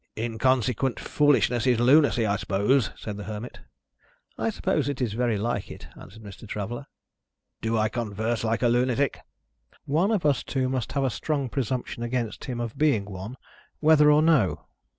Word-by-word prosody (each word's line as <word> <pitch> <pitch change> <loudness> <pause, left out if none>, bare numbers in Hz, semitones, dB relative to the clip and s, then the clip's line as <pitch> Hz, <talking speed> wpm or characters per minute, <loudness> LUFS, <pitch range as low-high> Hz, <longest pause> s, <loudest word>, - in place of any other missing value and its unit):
"Inconsequent 120 +2 0
foolishness 135 -4 +2
is 125 -2 +3
lunacy, 130 -1 +4
I 100 -1 +1
suppose?" 105 +7 +1
said 105 -2 -6
the 105 - -7
Hermit. 110 +3 -7 0.8
"I - - -1
suppose 150 - -1
it 140 - -4
is 120 -5 -1
very 120 -1 0
like 105 -1 -2
it," - - -10
answered 110 +4 -13
Mr. 100 +2 -11
Traveller. 110 +6 -5 0.7
"Do 115 0 0
I 110 0 +2
converse 110 0 -2
like 115 +2 0
a - - +5
lunatic?" 125 +3 +1 0.7
"One 165 +8 +1
of 210 -8 0
us 145 -3 +3
two 130 -2 -2
must 130 -3 -3
have 140 - 0
a 130 - +1
strong 140 +3 -2
presumption 125 -2 -3
against 120 -2 -3
him 125 -3 -4
of 115 -2 -5
being 140 -10 +2
one, 100 +5 -8 0.4
whether 150 -1 +6
or 150 +1 +5
no. 150 - +2
120 Hz, 170 wpm, -26 LUFS, 110-135 Hz, 0.8 s, whether